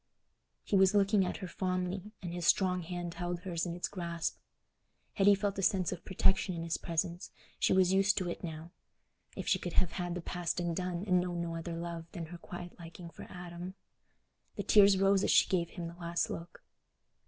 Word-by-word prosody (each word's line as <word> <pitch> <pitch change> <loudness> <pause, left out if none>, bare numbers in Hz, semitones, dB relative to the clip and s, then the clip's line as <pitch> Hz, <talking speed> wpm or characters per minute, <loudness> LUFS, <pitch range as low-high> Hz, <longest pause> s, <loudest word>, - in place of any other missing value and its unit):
He - - 0
was 190 +1 +5
looking 200 -1 +4
at - - -3
her - - -5
fondly, 185 +2 -2
and 175 -1 -4
his 175 -1 -2
strong 185 -2 +3
hand 175 0 -4
held 175 0 -3
hers 175 -2 -2
in 170 - -3
its 175 - -2
grasp. 170 -3 -3 0.7
Hetty 200 +1 +6
felt 200 0 -1
a - - +1
sense 190 -2 +2
of 180 -2 -6
protection 190 0 +2
in 165 - -4
his 165 0 -1
presence—she 170 +2 -2
was 185 -1 +4
used 195 +1 +4
to 185 - 0
it 175 - -5
now: 165 0 -6 0.6
if - - -5
she 185 - +3
could 175 -2 -5
have 180 -3 +2
had 175 -2 -3
the 180 - -3
past 175 0 -2
undone 175 +1 -2
and 180 -3 +4
known 175 -1 -3
no 170 -1 -3
other 165 0 -4
love 170 -1 -5
than 170 - -4
her 170 +2 -9
quiet 175 +1 -8
liking 170 0 -9
for - - -10
Adam! 175 +1 -7 0.8
The - - -3
tears 200 -2 +7
rose 195 0 +4
as - - +1
she - - +6
gave 170 -3 +1
him 175 -3 -6
the 165 - -8
last 170 0 -1
look. 170 +1 -8
175 Hz, 200 wpm, -32 LUFS, 170-190 Hz, 0.8 s, tears